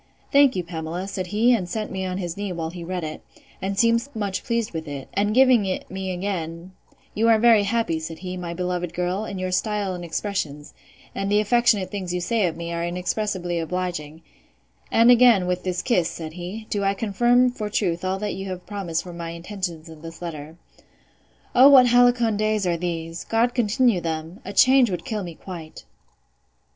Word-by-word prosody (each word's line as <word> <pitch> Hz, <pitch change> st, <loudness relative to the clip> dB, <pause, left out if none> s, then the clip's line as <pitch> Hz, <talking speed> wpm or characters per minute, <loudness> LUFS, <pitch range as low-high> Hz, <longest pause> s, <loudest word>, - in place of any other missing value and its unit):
Thank 280 Hz, -2 st, +5 dB
you, 180 Hz, -, -1 dB
Pamela, 170 Hz, +2 st, -5 dB
said 185 Hz, -2 st, -4 dB
he, 225 Hz, +6 st, +3 dB
and 185 Hz, -7 st, -1 dB
set 215 Hz, +3 st, -3 dB
me 190 Hz, -1 st, -3 dB
on 185 Hz, 0 st, -3 dB
his 175 Hz, -3 st, -4 dB
knee, 200 Hz, -1 st, -4 dB
while 165 Hz, -2 st, -4 dB
he 175 Hz, -1 st, -8 dB
read 180 Hz, 0 st, -4 dB
it; 155 Hz, 0 st, -6 dB, 0.4 s
and 195 Hz, +1 st, -3 dB
seemed 230 Hz, +3 st, +3 dB
much 200 Hz, -3 st, -2 dB
pleased 230 Hz, -2 st, -1 dB
with 160 Hz, -1 st, -5 dB
it; 140 Hz, -2 st, -6 dB
and 205 Hz, +2 st, +1 dB
giving 255 Hz, -4 st, +6 dB
it 185 Hz, -, -4 dB
me 190 Hz, 0 st, -4 dB
again, 175 Hz, -2 st, -4 dB, 0.4 s
You 225 Hz, +2 st, +2 dB
are 225 Hz, -, +6 dB
very 225 Hz, -1 st, +5 dB
happy, 215 Hz, -6 st, 0 dB
said 160 Hz, 0 st, -6 dB
he, 185 Hz, 0 st, -6 dB
my 175 Hz, -2 st, -5 dB
beloved 180 Hz, -1 st, -3 dB
girl, 180 Hz, +4 st, -1 dB
in 200 Hz, -, -6 dB
your 185 Hz, 0 st, -3 dB
style 205 Hz, 0 st, -1 dB
and 175 Hz, -1 st, -6 dB
expressions: 165 Hz, -5 st, -4 dB, 0.4 s
and 195 Hz, +1 st, -2 dB
the 205 Hz, -, +4 dB
affectionate 215 Hz, -2 st, +2 dB
things 185 Hz, -4 st, -3 dB
you -, -, 0 dB
say 205 Hz, +2 st, +1 dB
of 165 Hz, -, -4 dB
me 170 Hz, 0 st, -5 dB
are 170 Hz, 0 st, -2 dB
inexpressibly 180 Hz, 0 st, -2 dB
obliging; 165 Hz, -2 st, -4 dB, 0.7 s
and 230 Hz, +2 st, +6 dB
again, 240 Hz, -6 st, +6 dB
with 180 Hz, 0 st, -1 dB
this 180 Hz, -1 st, -2 dB
kiss, 180 Hz, -9 st, +2 dB
said 160 Hz, -2 st, -7 dB
he, 185 Hz, +6 st, -7 dB
do 205 Hz, -1 st, 0 dB
I 195 Hz, 0 st, +1 dB
confirm 240 Hz, +5 st, +3 dB
for 215 Hz, -4 st, -5 dB
truth 175 Hz, -5 st, -1 dB
all 185 Hz, +1 st, -1 dB
that 210 Hz, +1 st, -3 dB
you 195 Hz, 0 st, -6 dB
have 185 Hz, -1 st, -6 dB
promised 185 Hz, -5 st, -3 dB
for 180 Hz, -, -9 dB
my 170 Hz, -1 st, -6 dB
intentions 170 Hz, -1 st, -5 dB
in 160 Hz, -1 st, -12 dB
this 165 Hz, 0 st, -9 dB
letter.—O 170 Hz, -, -1 dB
what 265 Hz, -3 st, +8 dB
halcyon 245 Hz, -2 st, +4 dB
days 215 Hz, -1 st, 0 dB
are 175 Hz, -1 st, +1 dB
these! 165 Hz, -1 st, -4 dB
God 235 Hz, +2 st, +1 dB
continue 235 Hz, -3 st, +2 dB
them!—A 165 Hz, +4 st, -5 dB
change 255 Hz, +2 st, +5 dB
would 180 Hz, +5 st, -4 dB
kill 220 Hz, -5 st, -3 dB
me 170 Hz, -2 st, -7 dB
quite. 165 Hz, -4 st, -9 dB
185 Hz, 195 wpm, -23 LUFS, 170-215 Hz, 0.7 s, what